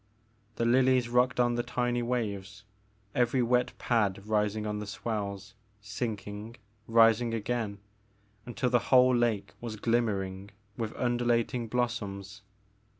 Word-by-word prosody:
The 115 - 0
lilies 125 0 +3
rocked 125 +1 +2
on 120 -1 +3
the 120 - 0
tiny 120 0 -1
waves, 110 -4 -3 0.5
every 125 +1 +2
wet 125 +1 +1
pad 100 -4 0
rising 105 0 0
on 105 0 -2
the 105 - -6
swells, 100 -2 -4 0.3
sinking, 105 +1 -5 0.3
rising 115 0 +4
again 110 -2 -2 0.7
until 125 +1 -1
the 120 - +4
whole 130 -1 +6
lake 120 -4 0
was 115 -2 -5
glimmering 100 -4 -1 0.3
with 110 -1 -4
undulating 120 0 0
blossoms. 105 -4 -3
115 Hz, 120 wpm, -29 LUFS, 105-120 Hz, 0.7 s, whole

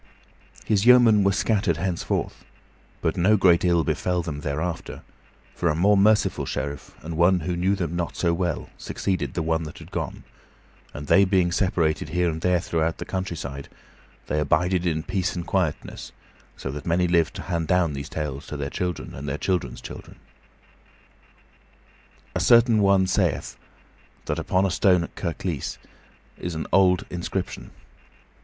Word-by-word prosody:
His 105 +1 +1
yeomen 120 -5 +7
were 100 - +4
scattered 100 -4 +1
henceforth, 90 0 -2 0.6
but 80 - 0
no 100 +5 +4
great 90 -3 +4
ill 85 -2 +3
befell 85 +3 -1
them 75 -4 -5
thereafter, 75 +4 -4 0.5
for 85 - 0
a 75 - +1
more 100 +5 +4
merciful 105 +2 +3
sheriff 70 -1 -5
and 80 +1 -5
one 90 +2 +4
who 85 +3 -2
knew 95 +3 +1
them 85 -3 -3
not 85 -1 -3
so 85 -2 +1
well 85 -1 -2
succeeding 80 -9 -2
the 85 - -2
one 80 0 0
that 75 -2 -8
had - - -12
gone, - - -4 0.7
and 75 - -7
they 100 +6 +5
being 95 -2 +2
separated 85 -5 0
here 90 +1 +1
and 80 0 -6
there 90 0 +2
throughout 80 -2 -1
the - - -6
countryside, 80 -7 -5 0.6
they 75 - -1
abided 90 +4 +1
in 80 -2 -1
peace 90 +1 -2
and 85 -1 -4
quietness, 90 -5 -2 0.5
so 70 - -5
that 75 +3 -7
many 90 +2 +2
lived 85 -2 +2
to - - -6
hand 85 -2 -2
down 90 -4 +2
these 70 0 -6
tales 75 -3 -5
to 75 - -5
their 70 0 -4
children 90 -3 -3
and 70 +1 -6
their 70 - -2
children's 85 -9 -2
children. - - -10 2.2
A - - -1
certain 115 -2 +5
one 100 -1 +4
sayeth 95 - 0 0.7
that - - -2
upon 95 +1 +1
a 95 - 0
stone 90 -1 +3
at - - -8
Kirklees 85 -3 -3 0.6
is 90 -2 -4
an 80 - -3
old 90 -2 +4
inscription. 90 +1 -4
85 Hz, 160 wpm, -24 LUFS, 80-95 Hz, 2.2 s, yeomen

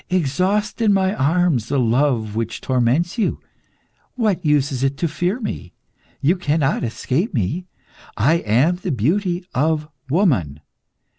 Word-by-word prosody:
Exhaust 185 - 0
in 215 -2 +4
my 190 0 +2
arms 155 - +1
the 140 - 0
love 120 -3 +1
which 115 0 -3
torments 130 - 0
you. 210 - 0 0.8
What 210 -7 0
use 150 -2 +2
is 130 -1 -3
it 135 0 0
to 170 - 0
fear 175 - -1
me? 95 - -6 0.5
You 170 +7 +2
cannot 150 -4 0
escape 135 - -2
me; 145 - -1 0.5
I 150 +11 +3
am 140 +8 +2
the 180 - -4
beauty 175 - 0
of 150 +2 0 0.2
woman. 125 - +1
150 Hz, 140 wpm, -20 LUFS, 125-180 Hz, 0.8 s, in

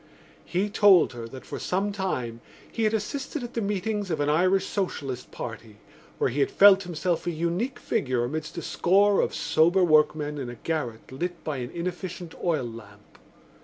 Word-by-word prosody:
He 185 +4 0
told 195 -8 +5
her 115 -1 -7
that 130 +2 -11
for - - -6
some 195 +3 -1
time 130 - -3 0.3
he 225 - -1
had 215 - +2
assisted 265 +6 -4
at 240 - -7
the 230 - -1
meetings 205 0 -2
of 160 -3 -1
an 145 0 +1
Irish 185 +5 +3
Socialist 140 -10 -3
Party 115 -2 -8 0.4
where - - +1
he 140 - -3
had 140 - +3
felt 195 -1 +7
himself 175 -1 -2
a - - +1
unique 170 - -2
figure 130 -3 -1
amidst 155 +6 -4
a 170 - -4
score 200 +5 +3
of - - -1
sober 160 +5 +3
workmen 150 -2 +3
in 130 -3 -4
a 120 - -7
garret 125 -6 -4
lit 175 +6 -4
by 150 -3 -3
an 125 -1 -4
inefficient 175 0 -5
oil 160 -7 +1
lamp. 105 -3 -12
170 Hz, 180 wpm, -26 LUFS, 135-195 Hz, 0.4 s, felt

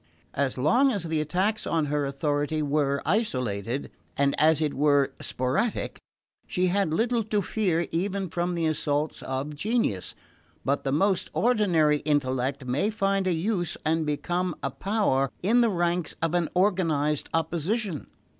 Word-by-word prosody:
As 135 -2 0
long 215 - +4
as 200 -7 -2
the 160 -2 -1
attacks 190 +8 -1
on 160 -2 +1
her 145 -1 0
authority 145 +2 -1
were 140 -1 0
isolated, 125 - -1 0.3
and 140 0 +2
as 155 0 +5
it 150 -2 0
were 145 -1 +2
sporadic, 130 - -1 0.5
she 180 - 0
had 195 -3 +1
little 230 +7 +1
to 210 -2 0
fear 175 -5 0
even 190 +3 -1
from 175 +1 -2
the 165 -1 0
assaults 150 -1 -1
of 135 +3 -3
genius; 200 - -1 0.5
but 140 +2 0
the 135 - -1
most 190 +6 +1
ordinary 180 -11 +3
intellect 135 -2 -1
may 130 +11 0
find 195 -2 0
a - - +2
use 175 +1 -1
and 160 +1 +2
become 175 +4 -1
a - - -1
power 190 -10 +1
in 230 +6 +4
the 235 - +4
ranks 175 -3 -1
of 165 0 -1
an 175 -2 +1
organised 165 -6 +1
opposition. 170 - -1
160 Hz, 150 wpm, -26 LUFS, 145-195 Hz, 0.5 s, as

